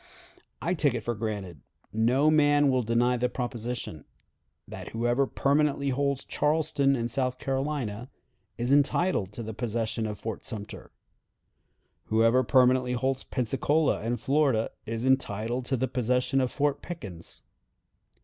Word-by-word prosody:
I 175 - +1
take 145 -7 +1
it 115 - -3
for 120 - -1
granted, 100 - -5 0.3
no 125 +7 +3
man 145 -1 +4
will 130 -1 +2
deny 120 +2 +2
the 125 +1 0
proposition, 120 - -5 0.6
that - - -8
whoever 120 +4 +1
permanently 140 0 +1
holds 140 0 -1
Charleston 150 -2 +1
and 120 -2 -2
South 130 0 -1
Carolina 135 -5 -3 0.5
is 120 +2 -1
entitled 145 - +2
to 115 - -6
the 110 0 -6
possession 115 -1 -2
of 105 -1 -5
Fort 110 -1 -5
Sumter. 105 -2 -7 1.2
Whoever 115 +3 +3
permanently 125 0 +3
holds 130 +2 -1
Pensacola 135 +5 +1
and 115 +2 -2
Florida 135 -4 +1 0.2
is 115 +2 -3
entitled 120 -2 0
to 130 0 0
the 130 +2 0
possession 125 +2 +1
of 130 - 0
Fort 145 -1 0
Pickens. 100 - -9
125 Hz, 135 wpm, -28 LUFS, 115-140 Hz, 1.2 s, man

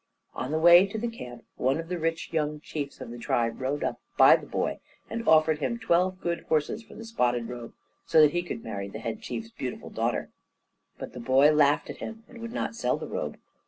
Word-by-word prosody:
On 130 - -4
the 155 - 0
way 175 +4 +8
to 220 +4 -3
camp, 125 - -9
one 135 +4 +1
of 165 - -5
the 180 0 -3
rich 165 +1 -2
young 150 -1 0
chiefs 145 -2 -6
of - - -7
the 120 - -8
tribe 115 +1 -1
rode 140 +3 -1
up - - -2 0.2
by - - +9
the - - -6
boy - - -2 0.3
and 230 0 -4
offered 155 -1 +5
him 235 +9 -1
twelve 185 -3 +1
good 170 0 -1
horses 155 +8 +1
for 225 - -15
the 225 - -9
spotted 120 - 0
robe, 120 -1 -8 0.3
so - - +5
that 150 -1 +7
he 175 - 0
could 145 -10 -6
marry 100 -3 -4
the 100 - -7
Head 115 0 -5
Chief's 115 -2 -6
beautiful 125 +1 -6
daughter; - - -1 0.7
but - - -8
the 125 - -7
boy 130 +5 +5
laughed 150 -1 +3
at - - -10
him 225 0 -7
and 235 - -13
would 230 0 -6
not 240 - -2
sell 230 - 0
the - - -6
robe. - - -4
155 Hz, 225 wpm, -27 LUFS, 125-180 Hz, 0.7 s, by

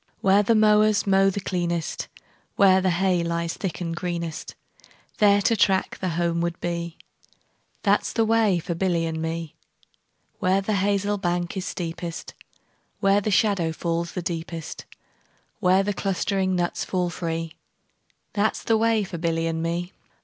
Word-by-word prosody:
Where 195 +1 +5
the 225 +3 +2
mowers 215 -1 +4
mow 195 0 +4
the 195 - -3
cleanest, 175 -3 -2 0.5
Where 190 -1 +5
the 185 - +2
hay 180 0 +1
lies 170 0 -2
thick 190 -5 -4
and 165 -1 -3
greenest, 170 -3 -4 0.2
10 - - -24 0.3
There 205 -1 +5
to 230 - +3
track 190 -2 +1
the 185 - -1
homeward 170 0 0
bee, 170 -1 -4 0.9
That - - +3
's - - -4
the 225 - +1
way 220 -4 +3
for 170 +1 -3
Billy 170 -1 0
and 160 -1 -3
me. 165 -1 -4 0.9
Where 185 +1 +2
the 195 +2 -1
hazel 200 +1 +1
bank 175 0 -1
is 190 -1 -3
steepest, 170 -1 -5 0.7
Where 195 +1 +3
the 215 - -1
shadow 200 -5 +2
falls 170 +1 -2
the 180 - -4
deepest, 165 -1 -5 0.7
Where 190 -1 +4
the 205 +1 -1
clustering 190 -1 0
nuts 175 -1 -1
fall 180 -2 -1
free, 165 -1 -3 0.8
15 - - -47
That 210 +1 +1
's - - -8
the 225 - +3
way 225 -1 +2
for 175 -3 -6
Billy 165 -1 0
and 165 0 -1
me. 170 +2 -2
180 Hz, 165 wpm, -24 LUFS, 170-200 Hz, 0.9 s, Where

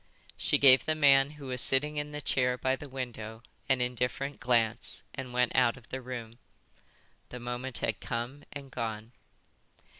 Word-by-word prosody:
She - - +2
gave 130 -2 +7
the 155 -1 +1
man 140 -2 +6
who 140 - -9
was 125 -2 -2
sitting 150 +3 +2
in 145 0 -3
the 150 0 -5
chair 125 -2 +1
by 130 +1 +1
the 145 +1 -10
window 115 -4 -6 0.3
an 130 -2 +3
indifferent 125 +3 -2
glance, 120 -2 0
and 130 -2 -6
went 125 0 +1
out 125 -1 +4
of 125 - -17
the 130 - -4
room. 120 -2 -7 0.9
The 125 - -7
moment 120 +1 -4
had 110 - -1
come 120 +5 -4
and 140 -2 -8
gone. 110 -2 -4
125 Hz, 170 wpm, -30 LUFS, 120-135 Hz, 0.9 s, gave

